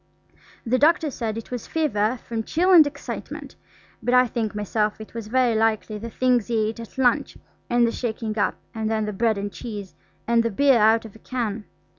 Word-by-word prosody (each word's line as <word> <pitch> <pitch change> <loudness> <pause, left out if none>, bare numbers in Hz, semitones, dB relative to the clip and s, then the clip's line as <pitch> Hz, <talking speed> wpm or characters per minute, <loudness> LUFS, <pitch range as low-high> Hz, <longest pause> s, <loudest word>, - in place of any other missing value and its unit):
The 250 +2 +1
doctor 310 0 +3
said 225 -4 -3
it 230 - -8
was 245 -2 -5
fever 255 -7 0
from 230 -1 -2
chill 345 - +1
and 320 -4 +8
excitement, 290 - -7 0.5
but 245 - +1
I 250 0 +6
think 225 -3 -3
myself 210 +1 -1
it 215 - -10
was 230 -2 -6
very 250 0 +2
likely 220 -1 0
the 230 +2 -6
things 245 -1 +1
he 220 -2 +1
ate 225 - -7
at 230 +3 -10
lunch, 250 -2 +1 0.3
and 240 0 +4
the 230 - +1
shaking 225 -3 -3
up, - - +1 0.2
and 220 -1 -2
then 220 -1 0
the 210 - -3
bread 220 +1 +1
and 205 0 -4
cheese; 205 -5 -7 0.3
and 235 0 +4
the 230 - 0
beer 265 +3 +4
out 220 +2 +4
of 220 - -11
a - - -14
can. 225 -4 -3
230 Hz, 205 wpm, -24 LUFS, 215-250 Hz, 0.5 s, and